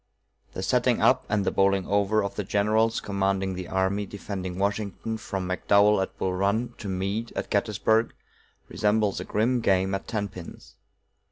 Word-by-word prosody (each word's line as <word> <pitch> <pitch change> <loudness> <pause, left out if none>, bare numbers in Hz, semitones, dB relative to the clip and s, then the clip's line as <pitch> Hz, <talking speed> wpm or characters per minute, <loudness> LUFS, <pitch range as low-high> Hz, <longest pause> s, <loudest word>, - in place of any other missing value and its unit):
The - - -5
setting - - +2
up - - +3
and 100 -2 +1
the - - +1
bowling 95 -1 +2
over 100 +1 +2
of 100 0 -3
the 105 - -3
generals 110 +3 +1
commanding 95 -1 -1
the 90 -1 -6
army 95 +2 0
defending 95 -2 -6
Washington 100 +2 -2
from 95 -4 -4
McDowell 100 +2 +3
at 95 - -4
Bull 95 - -1
Run 100 +6 0
to 105 - -6
Meade 100 +5 -2
at - - -4
Gettysburg, 110 +2 +1 0.6
resembles 105 -1 +1
a - - -4
grim 120 +4 +1
game 95 -2 +2
at 95 - -3
tenpins. 100 -6 -6
100 Hz, 160 wpm, -26 LUFS, 95-105 Hz, 0.6 s, up